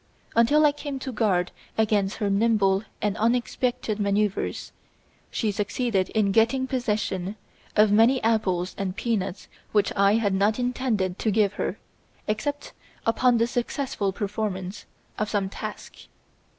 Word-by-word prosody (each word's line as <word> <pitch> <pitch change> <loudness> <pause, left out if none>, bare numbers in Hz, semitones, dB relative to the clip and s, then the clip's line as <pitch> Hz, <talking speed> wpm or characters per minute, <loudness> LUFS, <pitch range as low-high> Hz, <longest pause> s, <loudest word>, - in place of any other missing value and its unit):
Until 290 +7 +5
I 295 - +6
came 285 -1 -5
to 265 0 -5
guard 190 -7 +1 0.3
against 210 -2 +2
her 210 - -1
nimble 200 -2 +3 0.2
and 205 -1 +1
unexpected 240 -1 0
manoeuvres, 200 0 0 0.6
she 220 -3 -1
succeeded 205 -1 -1
in 210 -3 +1
getting 230 +5 +3
possession 215 -7 -2 0.4
of 210 -1 +5
many 230 +5 +5
apples 190 -5 +1
and 190 -2 -2
peanuts 200 -6 -2 0.3
which 205 -2 +2
I 200 +1 +4
had 210 -3 +1
not 205 +3 +2
intended 245 -7 -1
to 220 - 0
give 210 -1 +2
her - - -3 0.5
except 285 +7 -3 0.3
upon 240 +2 +3
the 230 - +3
successful 240 -3 -2
performance 200 -2 -4 0.3
of 215 0 -1
some 200 -2 0
task." - - -7
215 Hz, 135 wpm, -25 LUFS, 200-235 Hz, 0.6 s, I